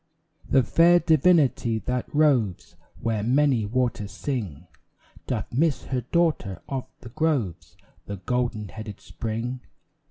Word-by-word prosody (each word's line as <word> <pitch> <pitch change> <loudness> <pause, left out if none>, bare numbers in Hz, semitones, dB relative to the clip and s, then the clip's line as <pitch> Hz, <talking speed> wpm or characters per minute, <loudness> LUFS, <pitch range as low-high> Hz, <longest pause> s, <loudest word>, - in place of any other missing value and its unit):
The 135 -1 +4
fair 170 +6 +5
divinity 155 -8 +3
that 125 +2 -3
roves 135 - +1 0.3
Where 115 -2 0
many 125 -1 +2
waters 120 -3 -1
sing 100 - -4 0.6
Doth - - -3
miss 145 +2 +1
her 130 -1 -2
daughter 160 - +1
of 135 -2 -4
the 120 - -10
groves 115 - -2 0.3
The 100 - -5
golden 120 0 -2
headed 110 -1 -8
Spring. 115 +3 -4
125 Hz, 120 wpm, -25 LUFS, 110-145 Hz, 0.6 s, fair